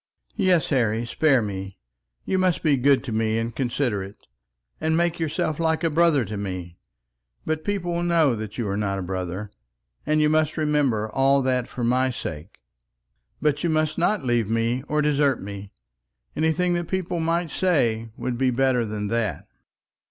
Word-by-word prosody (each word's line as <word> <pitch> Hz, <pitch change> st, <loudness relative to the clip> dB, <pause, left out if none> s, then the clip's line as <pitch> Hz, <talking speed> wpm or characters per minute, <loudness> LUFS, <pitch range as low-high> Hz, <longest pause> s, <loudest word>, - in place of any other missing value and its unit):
"Yes, 185 Hz, -7 st, +2 dB
Harry, 115 Hz, -3 st, +1 dB
spare 135 Hz, 0 st, +2 dB
me; 95 Hz, -1 st, -5 dB, 0.5 s
you 190 Hz, -, 0 dB
must 185 Hz, -2 st, +1 dB
be 150 Hz, -3 st, +4 dB
good 135 Hz, +1 st, +3 dB
to 130 Hz, -, -5 dB
me 110 Hz, 0 st, 0 dB
and 115 Hz, 0 st, -3 dB
considerate, 120 Hz, -7 st, -2 dB, 0.5 s
and 160 Hz, +1 st, +1 dB
make 170 Hz, 0 st, +1 dB
yourself 155 Hz, -1 st, -1 dB
like 160 Hz, 0 st, +1 dB
a 165 Hz, -, +2 dB
brother 160 Hz, -5 st, +3 dB
to 105 Hz, -, -5 dB
me. 90 Hz, -3 st, -5 dB, 0.7 s
But 155 Hz, 0 st, -2 dB
people 185 Hz, -3 st, -2 dB
will 170 Hz, -, -1 dB
know 165 Hz, -6 st, +3 dB, 0.2 s
you 110 Hz, 0 st, -3 dB
are 100 Hz, -, -1 dB
not 100 Hz, -1 st, -1 dB
a 95 Hz, -, -3 dB
brother, 95 Hz, +2 st, -4 dB, 0.5 s
and 155 Hz, +1 st, +1 dB
you 150 Hz, -, +4 dB
must 155 Hz, +1 st, +1 dB
remember 145 Hz, -8 st, +1 dB
all 135 Hz, +2 st, +3 dB
that, 125 Hz, -2 st, 0 dB
for 125 Hz, -, -5 dB
my 130 Hz, +2 st, +2 dB
sake. 80 Hz, -7 st, -6 dB, 0.9 s
But 150 Hz, +1 st, +1 dB
you 170 Hz, -, +1 dB
must 155 Hz, -1 st, 0 dB
not 190 Hz, +1 st, +1 dB
leave 120 Hz, -4 st, +1 dB
me 115 Hz, +2 st, 0 dB
or 150 Hz, 0 st, +1 dB
desert 145 Hz, -3 st, +2 dB
me. 100 Hz, 0 st, -8 dB, 0.6 s
Anything 160 Hz, +3 st, +1 dB
that 175 Hz, -1 st, -2 dB
people 185 Hz, -2 st, -2 dB
might 165 Hz, 0 st, 0 dB
say 120 Hz, -11 st, +1 dB
would 125 Hz, -2 st, -3 dB
be 130 Hz, -1 st, +3 dB
better 125 Hz, -1 st, +2 dB
than 105 Hz, -1 st, -3 dB
that." 110 Hz, -8 st, -1 dB
135 Hz, 170 wpm, -24 LUFS, 110-160 Hz, 0.9 s, be